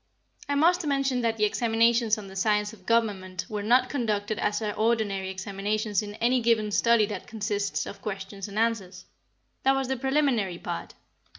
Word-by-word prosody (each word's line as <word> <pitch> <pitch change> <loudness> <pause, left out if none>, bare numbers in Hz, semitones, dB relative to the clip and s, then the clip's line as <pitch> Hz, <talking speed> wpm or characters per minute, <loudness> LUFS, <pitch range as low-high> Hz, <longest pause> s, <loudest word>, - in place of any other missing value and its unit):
I 285 - +1
must 345 +5 +3
mention 275 -3 +1
that 230 -1 0
the 210 - +3
examinations 230 +1 +2
on 210 - -8
the 190 0 -11
science 210 +2 +1
of 185 -4 -17
government 200 -5 0
were 210 -1 -4
not 245 +4 +4
conducted 215 -6 -1
as 205 - 0
are 210 -2 -2
ordinary 215 -4 0
examinations 200 +2 -2
in 205 -1 -7
any 245 +3 +2
given 225 -2 +2
study 230 +1 +4
that 205 0 -6
consists 205 -2 -2
of - - -9
questions 195 -1 -5
and 200 +1 -8
answers. 195 -6 -1 0.6
That 270 0 +3
was 270 -1 -1
the 265 - 0
preliminary 265 -8 +1
part. - - -6
215 Hz, 175 wpm, -27 LUFS, 200-235 Hz, 0.6 s, not